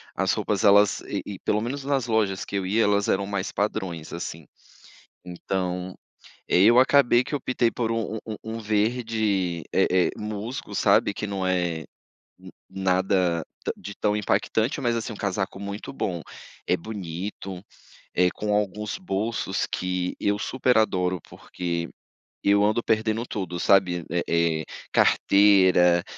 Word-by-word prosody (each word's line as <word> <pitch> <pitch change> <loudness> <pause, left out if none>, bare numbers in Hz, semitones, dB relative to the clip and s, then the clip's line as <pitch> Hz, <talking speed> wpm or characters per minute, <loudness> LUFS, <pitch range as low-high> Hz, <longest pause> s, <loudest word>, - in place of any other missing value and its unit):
as 95 -1 +1
roupas 105 -1 -1
elas, 100 -2 +5
e - - -4
e 100 -2 -7
pelo 105 - 0
menos 135 +5 -4
nas 135 -4 0
lojas 105 -4 +1
que - - -6
eu 95 - -2
ia, 110 +5 +2
elas 100 0 +2
eram 100 +1 +1
mais 100 -1 -3
padrões 90 -6 -3
assim. 85 -2 -6 0.8
Então, 90 0 -3 0.5
e - - 0
aí, 95 +4 +7
acabei 130 -2 +5
que 145 - -5
optei 125 -4 0
por 115 -1 -2
um 110 -1 -2
um 110 -1 -5
um 110 +1 -5
verde, 105 -5 0
eh - - +3 0.2
eh, - - -2
musgo, 105 +2 -5
sabe, 100 0 +3
que 105 - -4
não 95 -2 -2
é 90 -3 0 0.9
nada 95 -2 +1 0.2
ta - - -1
de 100 - -8
tão 105 -1 +1
impactante, 110 +5 0
mas 120 -3 +1
assim 115 0 -3
um - - -8
casaco 95 -1 -3
muito 100 +4 -6
bom. 90 -10 -3 0.4
É - - +2
bonito, 95 -1 -6 0.5
eh, 90 0 +3
com 105 +1 -2
alguns 105 +1 -1
bolsos 110 - -2
que 90 0 -2
eu 100 0 +1
super 130 0 +1
adoro, 90 -5 +1
porque 85 -1 -4 0.6
eu 100 0 +4
ando 110 +3 +2
perdendo 110 +1 0
tudo, 90 -4 -4
sabe: 90 -3 +3
eh 85 +1 0 0.4
eh, - - -8 0.3
carteira, 95 -3 +5
100 Hz, 150 wpm, -25 LUFS, 90-110 Hz, 0.9 s, aí